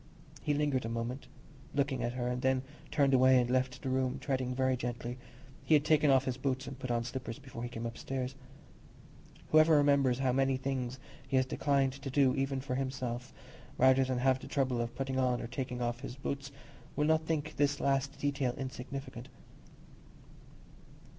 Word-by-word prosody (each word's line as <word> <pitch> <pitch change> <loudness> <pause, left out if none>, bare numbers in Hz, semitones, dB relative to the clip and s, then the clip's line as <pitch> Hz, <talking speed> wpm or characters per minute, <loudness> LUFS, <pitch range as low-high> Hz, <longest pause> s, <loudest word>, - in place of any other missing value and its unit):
He 145 - 0
lingered 145 -3 +1
a 115 - -3
moment, 120 +3 -4 0.5
looking 140 -3 0
at 120 0 -1
her, 125 -1 -2
and 125 0 -2
then 130 -1 +2 0.3
turned 140 -3 +3
away 130 0 +6
and 120 - +1
left 130 0 0
the 135 - -2
room, 130 -1 0
treading 130 -2 -2
very 130 0 +2
gently—he 125 +3 -5
had 150 0 +3
taken 155 -1 +4
off 135 -1 +4
his 125 -1 -2
boots 130 0 -1
and 135 0 -8
put 130 - -5
on 120 -1 +1
slippers 125 0 -5
before 135 -4 -9
he 120 - -3
came 120 -1 -5
upstairs. 130 +2 -4 1.2
Whoever 155 +1 +6
remembers 140 -3 +4
how 130 -1 +1
many 135 +1 +2
things 130 -1 -3 0.3
he 130 - +1
has 130 - +3
declined 135 0 +1
to 140 0 -7
do 135 -1 +3
even 135 -1 -1
for 130 -1 -4
himself, 125 -2 -3 0.5
rather 130 +1 +5
than 130 -1 -1
have 130 +1 +3
the - - -9
trouble 130 -4 0
of 120 +1 -4
putting 135 0 -2
on 125 -1 +2
or - - -4
taking 125 0 -4
off 120 0 -2
his 130 -2 -7
boots, 140 +1 -4 0.4
will 150 - +1
not 160 0 +2
think 155 -1 -2
this 145 0 +2
last 140 0 0
detail 140 -3 -1
insignificant. 130 -1 -6
130 Hz, 180 wpm, -32 LUFS, 125-140 Hz, 1.2 s, away